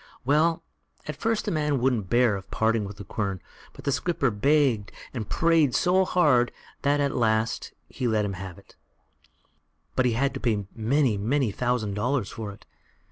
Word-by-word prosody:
Well, 160 +4 +2 0.4
at 150 - -4
first 225 +8 -1
the - - -1
man 150 -3 0
wouldn't 120 -7 0
hear 120 -3 +4
of 95 - -8
parting 110 -1 +1
with 100 0 -8
the 100 - -7
quern; 100 -1 -3 0.3
but - - -13
the 140 - +1
skipper 140 -4 0
begged 130 -2 +2 0.2
and 115 -5 -5
prayed 165 -5 +3
so 185 +1 +3
hard 145 -10 +3 0.3
that 145 +1 +2
at 140 -1 0
last 110 -1 0 0.2
he 125 - -3
let 110 -2 +1
him 100 - -3
have 95 -1 -7
it, 100 - -19 1.2
but 130 -1 +3
he 120 - +1
had 135 +4 +1
to 135 - -5
pay 110 -6 0
many, 120 -1 +1
many 120 +2 +1
thousand 120 -2 -1
dollars 120 +2 -1
for 110 -2 -6
it. 100 - -15
125 Hz, 180 wpm, -26 LUFS, 105-145 Hz, 1.2 s, hear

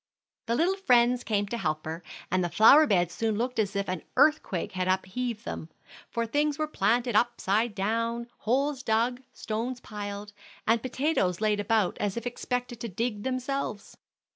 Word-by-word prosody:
The 230 - +1
little 355 +8 +2
friends 245 -8 +3
came 205 -2 0
to 235 - -3
help 155 -4 -2
her, 160 +2 -5 0.3
and 185 0 +2
the 175 - -1
flower 280 - +7
beds 175 -4 +2
soon 220 -2 -1
looked 250 +1 -1
as 200 -2 0
if 200 0 -1
an 185 -2 -3 0.2
earthquake 300 - +3
had 185 -1 -2
upheaved 210 +5 -1
them; 160 - -5 0.4
for 235 0 -1
things 290 +5 0
were 310 - 0
planted 240 -3 +1
upside 225 -1 +1
down, 230 +4 -1
holes 270 +4 0
dug, 235 +2 +1
stones 235 +3 -4
piled, 205 -2 -7 0.3
and 225 +1 +3
potatoes 255 - 0
laid 210 -1 +1
about 210 -2 +1
as 205 +1 -1
if 235 - -4
expected 245 0 -3
to 235 - -4
dig 215 +2 -2
themselves. 255 -3 -3
230 Hz, 165 wpm, -28 LUFS, 205-250 Hz, 0.4 s, flower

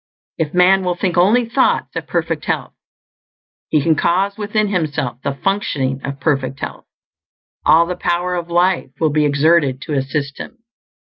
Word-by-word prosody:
_ - - +3
_If 150 - -12
man 185 +2 +5
will 180 -1 0
think 180 -1 -1
only 210 +8 +4
thoughts 255 +3 +1
of - - -4
perfect - - -2
health, - - -2 1.0
he 150 - +2
can 165 - +3
cause 190 +6 +1
within 210 0 -1
himself 150 -9 -2
the 140 0 -3
functioning 140 -9 -1
of 140 0 -5
perfect 135 -2 -1
health; - - -7 0.8
all 165 +1 +6
the 180 +1 -4
Power 175 +1 -1
of 175 -1 -4
Life 175 +2 +1
will 160 -2 +2
be 150 0 +2
exerted 145 -2 +2
to 150 - -5
assist 140 +1 -2
him. - - -8
170 Hz, 170 wpm, -18 LUFS, 140-185 Hz, 1.0 s, all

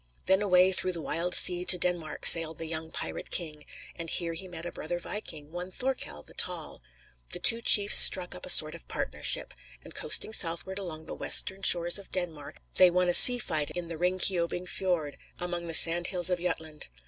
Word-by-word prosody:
Then 190 +1 +1
away 185 -2 +2
"through 185 0 -3
the 170 - -7
wild 175 +3 -3
sea" 180 0 +5
to 180 0 +3
Denmark 175 -3 -4
sailed 165 -2 +8
the 165 - -8
young 160 0 -7
pirate - - -7
king, 155 -4 -6 0.3
and 165 -1 -8
here 170 0 -2
he 185 +3 -9
met 170 -2 -11
a 175 - -7
brother 175 +3 -7
viking, 160 -5 -10
one 175 +2 -8
Thorkell 250 - -7
the - - -18
Tall. - - -5 0.5
The - - -3
two 230 +1 +3
chiefs 205 -3 +6
struck 180 -1 +5
up - - -10
a - - -7
sort - - +5
of - - -13
partnership; - - -6 0.3
and - - -14
coasting 220 - -1
southward 185 +1 -4
along 160 -5 -9
the - - -10
western 190 +1 -3
shores 175 0 +2
of 200 - -15
Denmark, 165 -6 -5 0.2
they 185 -1 +5
won 180 0 -1
a - - 0
sea 245 +7 +9
fight 155 -10 -3
in 175 -1 -7
the 165 - -8
Ringkiobing 180 0 -3
Fiord, 175 -7 -5 0.2
among 175 -1 -7
the 165 - -3
"sand 170 +1 +1
hills 180 -1 -4
of 180 - -2
Jutland." 160 -3 -6
175 Hz, 200 wpm, -26 LUFS, 165-185 Hz, 0.5 s, sea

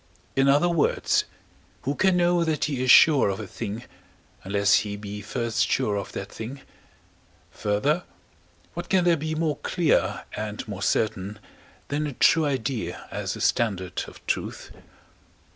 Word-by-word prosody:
In 135 0 +3
other 145 +5 +4
words, 170 -3 +2 0.6
who 140 - 0
can 190 +4 +2
know 175 -1 +3
that 160 -2 0
he 140 -4 -2
is 130 - -1
sure 145 -4 +7
of 95 - -3
a 110 - -5
thing, 110 +3 -6 0.6
unless 100 +1 +3
he 105 -1 -4
be 105 0 -7
first 115 +2 -1
sure 115 -6 +1
of 100 - -4
that 100 +1 -6
thing? 125 +5 -7 0.9
Further, 135 +12 0 0.7
what 175 0 -6
can 185 -2 +3
there 175 -1 +4
be 155 +1 -3
more 155 -2 0
clear, 170 -4 +1
and 105 0 -5
more 100 -2 -6
certain, 105 -1 0 0.5
than 150 +1 -1
a 145 - -5
true 160 +5 +4
idea 115 -10 -3
as - - -3
a - - -7
standard 95 -6 0
of - - -14
truth? - - -3
125 Hz, 155 wpm, -25 LUFS, 105-155 Hz, 0.9 s, sure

